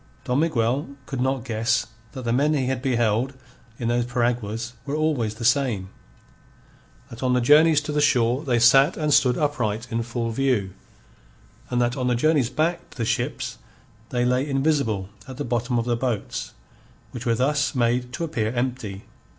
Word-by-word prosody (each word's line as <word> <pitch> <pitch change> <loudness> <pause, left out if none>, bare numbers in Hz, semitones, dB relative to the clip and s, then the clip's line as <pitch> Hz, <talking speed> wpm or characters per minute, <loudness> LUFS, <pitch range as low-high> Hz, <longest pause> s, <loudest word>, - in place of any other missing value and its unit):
Don 125 +2 0
Miguel 135 -3 +1 0.2
could 130 -2 -4
not 130 -2 0
guess 115 0 0 0.3
that 130 - -6
the 115 - +1
men 145 +4 +2
he 135 -3 0
had 130 0 -1
beheld 120 0 +1 0.4
in 115 - -3
those 120 0 +1
piraguas 120 -2 -1
were 140 +3 -3
always 145 -9 0
the 115 - -5
same; 120 -7 +1 1.2
that 115 - -9
on 130 -1 +1
the 125 - +3
journeys 150 +4 +5
to 150 0 -5
the 150 0 +1
shore 125 -1 +2
they 125 -5 +1
sat 135 +4 +5
and 150 -2 +1
stood 125 -3 +4
upright 120 -7 -1
in 115 0 0
full 115 0 -3
view; 115 -6 0 1.0
and 125 - 0
that 120 +1 +1
on 125 -1 -1
the 125 - +2
journeys 140 -1 +2
back 155 +6 -1
to - - -16
the 115 - -1
ships, - - -2 0.5
they 125 -1 0
lay 125 +3 +1
invisible 135 -9 0 0.2
at 130 -1 -9
the 145 - -3
bottom 120 +1 -1
of 115 - 0
the 120 -1 +1
boats, 120 -3 -3 0.6
which 125 +1 -6
were 115 - +3
thus 140 +4 +1
made 125 0 +1
to 150 - -4
appear 115 -10 -1
empty. 120 -5 -3
125 Hz, 180 wpm, -24 LUFS, 115-140 Hz, 1.2 s, journeys